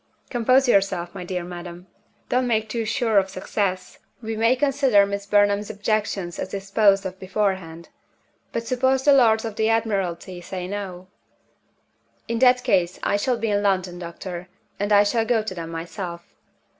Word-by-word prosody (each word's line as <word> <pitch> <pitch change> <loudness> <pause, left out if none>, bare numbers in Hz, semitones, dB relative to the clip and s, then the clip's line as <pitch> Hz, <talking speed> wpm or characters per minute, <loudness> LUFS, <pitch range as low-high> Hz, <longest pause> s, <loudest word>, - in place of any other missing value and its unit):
"Compose 255 +2 +3
yourself, 190 -6 +1
my - - -6
dear 180 0 -4
madam. 175 0 -8 0.4
Don't 250 0 +1
make 220 -2 +1
too 225 +1 -3
sure 220 -1 +2
of 190 0 -2
success. 185 0 -3 0.2
We 225 -1 -4
may 230 +3 +3
consider 270 -6 +3
Miss 200 0 -5
Burnham's 205 0 +2
objections 205 -4 -2
as - - -4
disposed 195 0 +2
of 190 0 -6
beforehand. 185 -4 -2 0.6
But 230 0 -3
suppose 260 +2 +1
the 285 - +6
Lords 230 -4 +4
of 220 -2 -6
the 220 0 +2
Admiralty 195 -5 -1
say 180 0 -6
No?" 190 -2 -6 1.2
"In 230 0 -2
that 250 0 +5
case, 180 -2 +1
I - - +1
shall 240 +4 0
be 225 -1 -1
in 205 0 +1
London, 185 -3 0
doctor; 175 +1 -7 0.3
and 205 +1 -1
I 205 0 +7
shall 225 +2 +1
go 225 -1 +1
to 215 - -4
them 165 -2 -6
myself. 170 +1 -7
205 Hz, 165 wpm, -23 LUFS, 185-225 Hz, 1.2 s, I